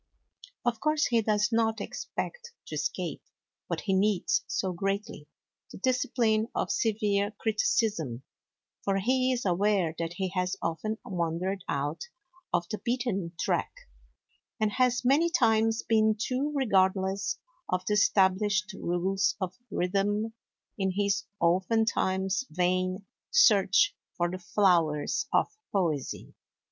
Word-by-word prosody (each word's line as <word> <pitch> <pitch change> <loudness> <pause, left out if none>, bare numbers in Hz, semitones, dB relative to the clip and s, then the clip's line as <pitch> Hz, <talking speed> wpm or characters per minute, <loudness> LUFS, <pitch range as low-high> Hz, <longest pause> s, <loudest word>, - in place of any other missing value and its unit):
Of 235 -2 0
course 305 +3 +2
he 235 -2 +2
does 210 0 +1
not 225 -1 +1
expect 475 - -5
to - - -9
escape, - - -3 0.5
what - - -2
he 195 - -1
needs 210 - +2
so 190 -2 -1
greatly, 195 -3 -3 0.4
the - - -9
discipline 230 -2 +1
of - - -1
severe 205 -2 +1
criticism; 205 - 0 0.6
for 195 -1 +1
he 255 +5 +2
is 250 -3 -2
aware 190 -2 +2
that 165 0 -2
he 190 +1 -2
has 180 0 -1
often 165 +7 -2
wandered 180 +1 -2
out 145 - -2 0.5
of 175 - +1
the 215 - -4
beaten 235 -8 -2
track, - - 0 0.9
and 215 -1 +1
has 250 +1 +1
many 295 +7 +4
times 225 -9 +2
been 220 -1 +3
too 260 +6 -1
regardless 195 -5 +1 0.3
of 185 0 -1
the 210 - 0
established 205 0 +2
rules 190 +1 0
of 185 -2 -3 0.2
rhythm, 205 +4 0 0.5
in 190 -1 +1
his 200 0 +1
(oftentimes 190 +2 +1
vain) 185 +2 0 0.2
search - - +5 0.2
for 175 0 0
the 185 - -5
flowers 175 - +2
of - - +1 0.2
poesy. 165 -9 -2
200 Hz, 125 wpm, -28 LUFS, 185-225 Hz, 0.9 s, search